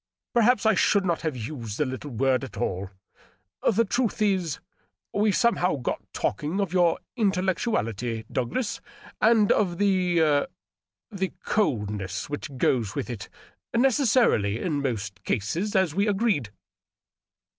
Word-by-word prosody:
Perhaps 235 -2 +3
I 220 - +5
should 200 -2 +3
not 170 -2 0
have 155 -5 -2
used 115 -3 -5
the 150 - +1
little 130 +3 -5
word 130 +1 +1
at 125 -7 -8
all... 95 -4 -2 0.8
The 230 +2 +2
truth 235 +2 0
is, 190 -7 +1 0.5
we 210 +1 +3
somehow 195 -5 +2
got 130 -4 -3
talking 150 - -2
of 195 -4 -1
your 175 -2 +3 0.2
intellectuality, 180 - 0
Douglas, 135 - -2 0.4
and 220 -2 +5
of 180 -5 +2
the 185 -3 +2
•. 150 -3 +3 0.6
the 190 -2 -3
coldness 105 - -1
which 140 -2 -5
goes 115 -5 +1
with - - -3
it 105 -5 -7 0.5
—necessarily 235 - +3
in 150 -2 -1
most 105 -7 -3
such - - -40
cases, 170 - -1
as 190 -5 +3
we 200 +4 +1
agreed." 200 - +1
170 Hz, 135 wpm, -26 LUFS, 120-205 Hz, 0.8 s, I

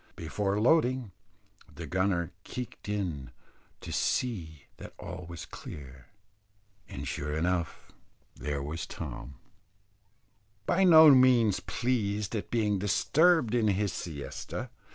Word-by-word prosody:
Before 100 +5 -2
loading, 130 -3 +2 0.6
the - - -8
gunner 95 -2 0
keeked 125 -4 -7
in 85 -10 -3 0.5
to - - -7
see 80 - -1
that - - -11
all 90 0 -8
was 85 -2 -7
clear, 65 -3 -10 0.8
and 70 +1 -6
sure 75 +4 -3
enough 85 0 -2 0.4
there 70 -1 -3
was 75 +3 -5
Tom, 70 +3 -7 1.3
by 190 +2 +2
no 160 -3 +9
means 125 -6 +5
pleased 110 -3 -1
at 105 - -4
being 105 -4 +1
disturbed 135 - +3
in 115 -3 +2
his 100 -1 0
siesta. 75 -5 -6
100 Hz, 110 wpm, -29 LUFS, 80-120 Hz, 1.3 s, no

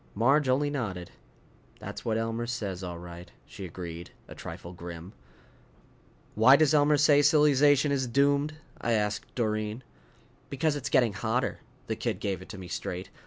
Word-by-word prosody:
Marge 135 +6 +3
only 145 +3 +2
nodded. 100 -11 -4 0.7
"That's - - -8
what 110 -1 0
Elmer 115 +1 -2
says, 100 -6 -4
all 90 -1 -5
right," 85 0 -10
she 95 - -9
agreed, 85 -1 -7 0.2
a - - -10
trifle 85 +1 -9
grim. 85 +1 -9 1.2
"Why 120 +5 +7
does 155 +1 +3
Elmer 150 0 +4
say 145 0 +5
silly 150 0 +5
zation 145 +1 +4
is 135 -2 0
doomed?" 140 +4 +2 0.3
I 120 - 0
asked 105 -1 -1
Doreen. 110 0 -2 0.7
"Because 145 +2 0
it's 140 -1 -4
getting 120 -6 +3
hotter." 115 +6 -1 0.3
The 110 - -2
kid 110 -4 -3
gave 100 -3 -3
it - - -12
to 105 - -8
me 95 -1 -8
straight. 90 +2 -5
115 Hz, 165 wpm, -28 LUFS, 95-140 Hz, 1.2 s, Why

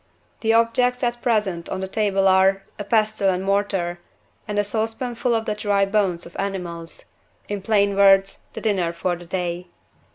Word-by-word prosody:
The 225 - +1
objects 245 +2 +2
at 240 0 -1
present 210 -8 0
on 190 - -3
the 190 - -3
table 195 -1 +1
are, 190 +1 +4 0.2
a - - -3
pestle 215 -1 +1
and 185 0 -1
mortar, 195 -3 0 0.5
and 210 -1 -3
a 205 - +3
saucepanful 230 +3 -2
of 225 0 -1
the 215 - -1
dry 205 -1 +1
bones 195 -4 0
of 170 - -13
animals 175 -4 -5 0.4
in 205 -1 -4
plain 200 -1 +2
words, 195 0 +4
the - - -7
dinner 185 -6 0
for 175 +1 -1
the 175 0 -12
day. 180 -1 -3
200 Hz, 170 wpm, -22 LUFS, 185-215 Hz, 0.5 s, are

